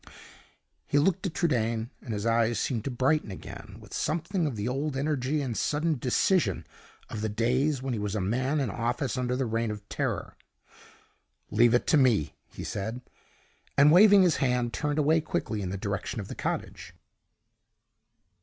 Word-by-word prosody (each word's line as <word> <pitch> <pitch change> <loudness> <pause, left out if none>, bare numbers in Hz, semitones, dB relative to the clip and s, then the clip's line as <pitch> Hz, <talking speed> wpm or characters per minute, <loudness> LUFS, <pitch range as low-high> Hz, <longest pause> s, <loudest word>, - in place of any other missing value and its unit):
He - - +1
looked 190 +6 +2
at 170 - -7
Trudaine, 115 -7 0
and 120 - -7
his 105 +1 -4
eyes 115 -1 +2
seemed 115 -5 -2
to - - -1
brighten 135 +2 +1
again 95 - -9
with - - -14
something 170 +2 -1
of 135 - -3
the 105 +1 -3
old 135 +2 -2
energy 145 0 0
and 125 -4 -3
sudden 150 +2 0
decision 125 - +1 0.4
of 105 - -5
the 110 - -1
days 125 +6 0
when 135 -2 -2
he 110 - -2
was 105 0 -3
a - - 0
man 130 +10 0
in 130 -7 -1
office 120 +3 -2
under 125 -1 -1
the 130 0 0
Reign 115 0 -1
of 105 -1 -7
Terror. - - -3 1.2
"Leave 120 +2 +5
it 120 - +1
to 155 - +4
me," 120 - +3 0.2
he - - -8
said; 110 +5 -4 0.8
and, 145 +2 +7
waving 200 +2 +7
his 175 -3 +3
hand, 125 -3 0
turned 150 0 -1
away 155 +2 +3
quickly 110 -7 -3
in 95 - -3
the 95 - -3
direction 100 +3 -3
of 100 - -6
the - - -5
cottage. - - -4
125 Hz, 175 wpm, -28 LUFS, 110-150 Hz, 1.2 s, and